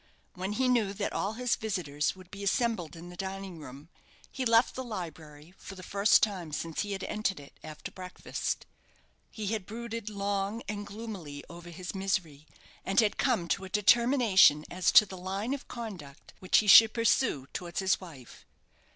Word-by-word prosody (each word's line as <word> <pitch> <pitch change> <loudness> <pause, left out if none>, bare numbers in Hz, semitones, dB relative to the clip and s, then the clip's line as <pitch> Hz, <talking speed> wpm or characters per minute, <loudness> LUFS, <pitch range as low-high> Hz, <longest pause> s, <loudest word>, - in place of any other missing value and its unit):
When 190 +2 -4
he 260 +4 +1
knew 230 -6 +2
that 200 0 -3
all 200 +2 -1
his 245 +1 0
visitors 165 -9 -2
would 185 -1 -15
be 200 0 -8
assembled 200 -5 0
in 170 +1 -10
the 180 - -10
dining 190 -2 -6
room, 145 +2 -11 0.4
he 260 - -3
left 230 +1 +4
the 260 - -5
library, 165 - -8
for 195 - -9
the 185 - -10
first 200 +3 +4
time 185 -7 -1
since 160 +1 -3
he 205 -1 -3
had 195 - -5
entered 210 -4 -2
it 140 - -15
after 155 -1 -8
breakfast. 185 -1 -5 0.6
He 215 - -6
had 210 -4 -3
brooded 230 -1 -5
long 200 +2 -2
and 205 0 -5
gloomily 200 -10 -7
over 175 0 -11
his 175 +1 -7
misery, 185 -6 -2 0.4
and 195 - +2
had 215 -3 +2
come 225 -10 +1
to 195 - 0
a 190 - -7
determination 210 - +5
as 180 0 +1
to 210 - +9
the 190 -2 -9
line 195 +7 -3
of 280 - -6
conduct 190 - -9
which 185 - +3
he 215 - +2
should 220 +2 +9
pursue 230 - +2
towards 170 -3 -4
his 190 0 +1
wife. 145 -10 -13
195 Hz, 180 wpm, -30 LUFS, 175-215 Hz, 0.6 s, to